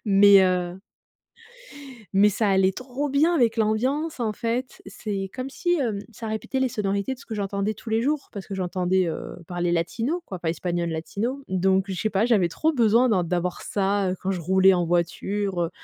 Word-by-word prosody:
mais 200 -1 +7
heu» 180 0 0 1.3
mais 205 +2 +5
ça 210 +1 0
allait 190 -1 +3
trop 260 +6 -4
bien 305 +5 +3
avec 240 -7 +2
l'ambiance 260 +9 0
en 220 -2 0
fait. 235 +4 -3
C'est 195 -3 -4
comme 255 +1 -5
si, 350 +4 0
heu, 225 -6 -1
ça 225 +1 -8
répétait 220 +4 -3
les 260 - +2
sonorités 200 +2 -1
de - - -20
ce - - -15
que 225 - -5
j'entendais 200 +1 -2
tous 220 +2 -9
les 220 +1 +2
jours 285 +4 -1
parce 200 -4 -7
que 195 - -6
j'entendais, 185 0 0
heu, 160 - -6
parler 175 0 -1
latino 225 - -1
quoi, 185 - -7
pas 170 - -3
espagnol 170 +1 -2
latino. 210 +12 -3
Donc 190 +1 +2
je - - -2
sais 220 - +1
pas, 200 +1 +2
j'avais 215 -7 +3
trop 315 - 0
besoin 235 -1 +4
d'en 185 -5 +2
d'avoir 180 +1 -2
ça, 200 -1 0
heu, 185 - -3
quand 190 - -1
je 185 -2 -2
roulais 190 +3 +4
en 175 -1 0
voiture, 175 +3 -1
heu, 165 - -3
200 Hz, 200 wpm, -24 LUFS, 185-235 Hz, 1.3 s, mais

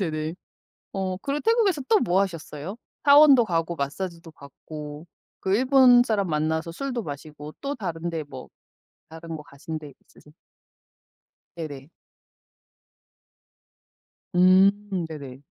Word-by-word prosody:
네네. 155 -2 -2 0.6
어 190 -1 -2
그리고 280 +8 -3
태국에서 440 - +2
또 435 - +5
뭐 190 -3 +2
하셨어요? 170 0 -4 0.3
사원도 280 -3 +8
가고 170 -3 -1
마사지도 165 +4 -5
받고 150 +2 -10 0.3
그 190 +1 0
일본 255 -1 +6
사람 215 -5 0
만나서 160 +2 -1
술도 250 +5 -3
마시고 150 +1 -8
또 280 0 -3
다른 170 -5 -4
데 160 -2 -4
뭐 135 -3 -10 0.6
다른 165 0 -8
거 150 - -8
가신 155 +1 -7
데 150 -2 -10 0.2
있으세 150 - -20 1.2
네네. 145 -4 -7 2.5
음 190 +1 +4
네네. 140 -5 -9
170 Hz, 230 characters per minute, -25 LUFS, 155-210 Hz, 2.5 s, 사원도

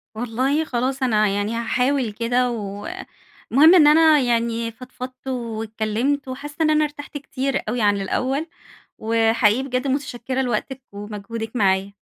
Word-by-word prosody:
والله 255 +7 0
خلاص 260 +1 -2
أنا 215 -4 +3
يعني 205 +3 -1
هاحاول 250 +1 0
كده، 245 +3 0
و 205 -3 -5 0.7
المهم 310 +8 +7
إن 310 -5 +7
أنا 310 0 +6
يعني 235 -2 0
فضفضت 255 +2 -10
واتكلِّمت، 230 +2 -2
وحاسة 285 +3 -7
إن 315 - +3
أنا 305 0 +3
ارتحت 290 0 -6
كتير 275 -1 -2
أوي 240 +1 -1
عن 205 -1 +2
الأول، 265 - -1 0.5
وحقيقي 225 +1 +2
بجد 255 0 -2
متشكرة 260 -1 -2
لوقتِك 255 +2 -2
ومجهودِك 210 +3 -7
معايا. 195 -2 +1
245 Hz, 135 wpm, -22 LUFS, 220-270 Hz, 0.7 s, المهم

